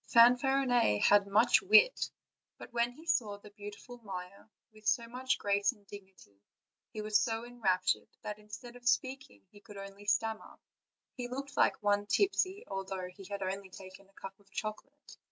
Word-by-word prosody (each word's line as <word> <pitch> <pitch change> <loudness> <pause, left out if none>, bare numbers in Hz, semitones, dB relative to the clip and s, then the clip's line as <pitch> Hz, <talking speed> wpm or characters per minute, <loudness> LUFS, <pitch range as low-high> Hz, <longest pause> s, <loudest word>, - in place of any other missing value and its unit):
Fanfarinet 245 - +5
had 205 -1 +5
much 220 +5 +4
wit; 435 +5 +5 0.5
but - - -12
when 235 0 +1
he 315 +6 -15
saw 215 -10 +1
the 205 0 -15
beau 205 0 -8
tiful 245 +4 -12
Maia, 190 -3 -8 0.3
with 215 0 -11
so 235 -2 +2
much 255 +2 -1
grace 200 0 +1
and 205 -4 -25
dignity, 190 - -14 0.5
he 215 -2 -5
was 210 -1 +3
so 225 +1 -1
enraptured 220 -7 0 0.2
that, 210 0 -5
instead 210 +4 -10
of 245 0 0
speaking, 260 - -2
he 205 - -15
could 205 0 -13
only 195 +1 -10
stam 220 +1 +1
mer; - - -15 0.6
he 245 -2 -5
looked 275 +3 -6
like - - +2
one 205 0 +2
tipsy, 395 - +1
although 190 -1 -4
he 195 +1 -13
had 200 +1 -5
only 190 +1 -4
taken 190 +1 -13
a - - -28
cup 195 0 -10
of 200 -1 -26
chocolate. 220 +9 -7
210 Hz, 175 wpm, -32 LUFS, 195-245 Hz, 0.6 s, Fanfarinet